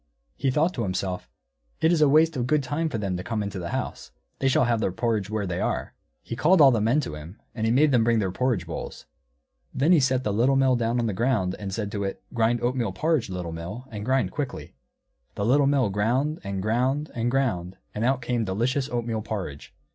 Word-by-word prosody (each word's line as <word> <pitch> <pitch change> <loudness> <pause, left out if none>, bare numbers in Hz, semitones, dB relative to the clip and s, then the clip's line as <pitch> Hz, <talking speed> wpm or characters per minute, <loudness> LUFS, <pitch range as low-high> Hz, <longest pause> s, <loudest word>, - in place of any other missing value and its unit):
He 135 - 0
thought 155 +7 +2
to 120 - -3
himself, 95 -2 -3 0.5
"It 160 - +3
is 170 -3 +2
a 150 - +6
waste 155 +2 +4
of 125 -2 -1
good 150 +1 +2
time 150 +5 -1
for 130 - -3
them 100 -3 -2
to 90 - -5
come 110 -1 -2
into 100 -2 -4
the 85 -1 -5
house; - - -4 0.3
they 135 - +1
shall 130 - +4
have 120 -2 +1
their 95 - 0
porridge 105 0 -1
where 110 -1 -2
they 90 -2 -3
are." - - -2 0.3
He 115 - -5
called 165 +10 +4
all 140 -3 +8
the 115 -3 +1
men 115 +7 +3
to 125 - -5
him, 75 +7 -10
and 110 -1 0
made 150 +2 +4
them 120 -3 +4
bring 115 0 +3
their 95 -4 0
porridge 115 -4 0
bowls. 80 - -7 0.7
Then 145 +6 +3
he 175 - +7
set 130 -1 +1
the 105 - -1
Little 125 +6 +3
Mill 135 -1 +4
down 120 0 0
on 120 - 0
the 110 - -1
ground, 110 -4 0
and 100 -2 -5
said 105 0 -3
to 100 -1 -2
it, 95 - -4
"Grind 115 0 +1
oatmeal 120 -5 0
porridge, 155 -1 0
Little 90 -2 -4
Mill, 90 +10 -7
and 105 -2 -5
grind 130 +3 +1
quickly!" 140 -4 -5 0.6
The 100 - -2
Little 135 +4 +4
Mill 135 -7 +2
ground, 125 +10 0
and 100 -1 -3
ground, 130 +7 0
and 120 0 -1
ground, 95 -9 -1 0.2
and 105 - -3
out 130 0 +1
came 120 -1 0
delicious 120 +8 -1
oatmeal 115 -2 -2
porridge. 95 -10 -6
115 Hz, 230 wpm, -25 LUFS, 100-135 Hz, 0.7 s, all